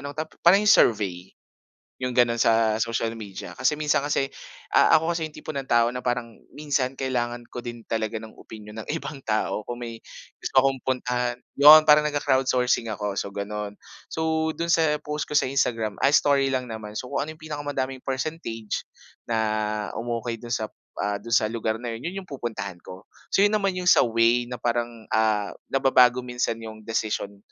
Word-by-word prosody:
anong 140 +1 -7
tap 155 0 -4 0.2
yung 200 +3 +5
survey. 95 - +3 0.7
Yung 125 - 0
ganon 120 -1 +3
sa 110 -1 +3
social 115 0 -1
media. 105 -4 -8
Kasi 150 - +1
minsan 150 -2 +1
kasi, 140 -1 0 0.5
ah, - - +6
ako 165 +2 -1
kasi 160 -2 -2
yung - - -17
tipo 155 - -6
ng 135 -1 -4
tao 120 0 +4
na 125 - -4
parang 120 -2 -2 0.2
minsan 135 -3 -2
kailangan 120 -2 -2
ko 120 - -7
din 120 -1 -8
talaga 110 0 -2
ng 110 0 -11
opinyon 105 0 -12
ng - - -16
ibang 140 -4 -8
tao 110 0 -1
kung 120 0 -5
may 115 -1 -7 0.4
gusto - - -5
akong 135 -1 +1
puntahan. 125 -1 -1 0.2
Yun 155 +2 +9
parang 150 0 +7
nag-crowdsourcing 130 -5 +1
ako 105 -1 -3
so 100 - -3
ganon. 105 0 -5 0.3
So 160 0 0
dun 170 - -2
sa 155 -2 +2
post 150 0 -2
ko - - -8
sa - - +1
Instagram 115 -5 0
ay 140 - +5
story 140 -2 +4
lang 130 -1 -1
naman. 110 -2 -6
So 125 - -6
kung - - +1
ano 155 - -7
yung 155 - -24
pinakamadaming 140 -3 -4
percentage 130 -5 -4 0.4
na 110 -2 -1
umokey 115 +1 -3
dun 120 - -9
sa 110 -1 -1 0.3
ah, 105 0 0
dun 115 - -8
sa 110 -2 +4
lugar 110 -1 -2
na 120 0 -5
yun, 125 +9 -5
yun 195 +1 -6
yung - - -24
pupuntahan 110 -8 -5
ko. 95 +2 -11 0.2
So - - +1
yun 205 +1 +3
naman 200 -2 +2
yung 180 - -4
sa - - +6
way 115 +1 +3
na 125 - -5
parang, 120 -1 -2
ah, 110 -2 +1 0.2
nababago 125 -2 +4
minsan 120 -2 -2
yung 110 -1 -9
desisyon 105 -2 -3
120 Hz, 190 wpm, -25 LUFS, 110-140 Hz, 0.7 s, Yun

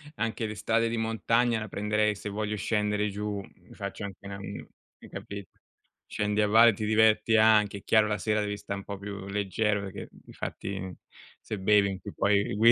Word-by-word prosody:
anche 115 0 -2
le 105 - -5
strade 115 +2 +1
di 115 - -2
montagna 115 +1 +1
la 105 - -5
prenderei 105 +1 0
se 105 - -6
voglio 105 +1 -2
scendere 105 0 0
giù, 105 0 -3
mi - - -17
faccio 100 +2 -6
anche 100 0 -10
una 100 0 -6
mhmm, 100 - -7 0.4
hai - - -13
capi 100 -1 -7 0.6
scendi 105 0 0
a 105 - +3
valle, 115 +2 +7
ti 105 +2 -4
diverti 110 +1 +4
anche, 105 -2 +4
è - - -20
chiaro 110 -1 +4
la 105 -1 0
sera 105 +2 0
devi 105 0 -2
sta 100 0 -5
n 100 - -7
po' 100 0 -6
più 100 -1 -7
leggero 105 +1 0
perché, 95 -1 -7
di - - -16
fatti, 95 -2 -5 0.5
se 110 - -5
bevi 100 +1 +4
in 95 -1 -5
cui - - -8
poi 100 0 +2
gui 115 +2 +7
105 Hz, 205 wpm, -28 LUFS, 100-110 Hz, 0.6 s, valle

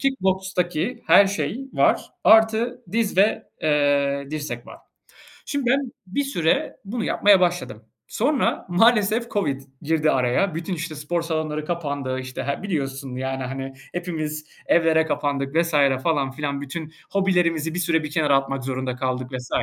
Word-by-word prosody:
kick 275 -1 0
bokstaki 185 +3 -1
her 200 - +7
şey 200 - -3
var, - - +2 0.2
artı 225 +3 +4
diz 225 -4 0
ve, 200 +3 +3 0.2
eee, 145 -2 +2
dirsek 145 -6 -5
var. - - -11 0.7
Şimdi, 280 -4 -1
ben 270 -1 +1
bir 235 +10 -1
süre 170 - 0
bunu 220 +3 -3
yapmaya 200 -2 +4
başladım. 175 -1 -1 0.2
Sonra 295 -3 0
maalesef 220 +4 +3
COVID 145 -10 -1 0.2
girdi 155 0 +2
araya, 130 +8 +1
bütün, 170 +3 -3
işte, 165 -1 -5
spor 160 +3 -2
salonları 155 -2 -2
kapandı, 145 -6 -3
işte, 130 0 -6
he 140 +6 -3
biliyorsun, 135 -8 -3
yani, 130 0 -3
hani 135 +1 -5 0.2
hepimiz 155 -4 -4 0.2
evlere 160 -1 +3
kapandık 145 -2 -2
vs. 170 0 +3 0.3
falan 145 -4 +1
filan, 140 0 -3
bütün 155 +3 -6 0.2
hobilerimizi 175 -5 +1
bir - - -2
süre 170 -2 +1
bir 150 - -4
kenara 150 -3 +3
atmak 135 -1 -2
zorunda 130 -1 -3
kaldık 130 0 -3
vs. 125 -1 -5
160 Hz, 150 wpm, -23 LUFS, 140-190 Hz, 0.7 s, her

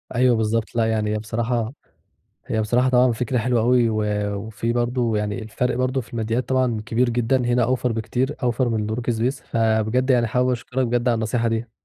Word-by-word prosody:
أيوَه 125 -1 +4
بالضبط، 110 +1 -1
لأ، 115 -1 +2
يعني 110 -1 0
هي - - 0
بصراحة 115 +2 -2 0.7
هي 110 - -1
بصراحة 125 +4 +2
طبعًا 125 -1 +4
فكرة 125 +2 -1
حلوة 120 0 +1
أوي 120 0 +3
و 110 -1 0 0.3
وفي 110 +2 -3
برضه 120 -1 0
يعني 105 +1 -2
الفرق 120 +3 -2
برضه 130 +1 0
في 120 - -13
الماديات 115 +2 -2
طبعًا 130 -4 +1
كبير 120 +1 +1
جدًا، 120 +2 +1
هنا 120 0 +2
أوفر 125 0 0
بكتير، 120 +6 -2
أوفر 120 0 +1
من 110 -2 -1
works 120 -1 -1
pace، 125 +4 -1
فبجد 115 +3 +1
يعني 120 -2 +4
حابب 125 +3 +1
أشكرك 125 +1 -2
بجد 120 +1 0
على 120 - +3
النصيحة 115 +1 0
دي. 115 0 -2
120 Hz, 190 wpm, -22 LUFS, 110-125 Hz, 0.7 s, أيوَه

